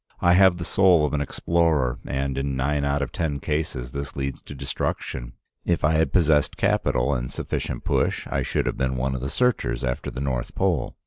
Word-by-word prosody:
I 85 - +4
have 95 -1 +6
the 85 - -4
soul 90 -6 +4
of 75 - -2
an 75 - +1
explorer, 80 -4 +1
and 70 0 -2
in 70 0 -2
nine 70 +2 0
out 70 0 +1
of 70 - -5
ten 75 -4 -2
cases 75 -5 -3
this 70 +1 -5
leads 70 -1 -3
to 70 - -10
destruction. 65 -2 -4 0.3
If 85 - 0
I 75 - +4
had 80 +1 +2
possessed 80 -5 +3
capital 60 +3 +1
and 60 -1 -3
sufficient - - -4
push, - - 0
I - - -1
should - - -1
have - - -2
been 65 -1 0
one 65 +1 0
of 65 - -4
the 65 - -3
searchers 70 - 0
after 60 -1 -2
the - - -6
North 65 -3 -2
Pole. - - 0
70 Hz, 205 wpm, -24 LUFS, 65-80 Hz, 0.3 s, have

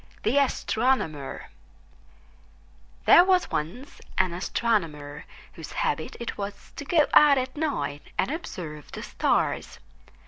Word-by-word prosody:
THE 250 +7 +3
ASTRONOMER 225 - 0 1.6
There 350 - +9
was 370 -1 +2
once 220 - -4 0.2
an 185 -2 +2
Astronomer 165 -7 -2 0.3
whose - - -9
habit - - -2
it 235 -2 -5
was 200 0 -6
to 285 - -6
go 310 0 +4
out 290 -2 +7
at 255 0 -2
night 150 - -2 0.2
and - - +1
observe 165 - -7
the - - -7
stars. - - 0
225 Hz, 115 wpm, -26 LUFS, -, 1.6 s, There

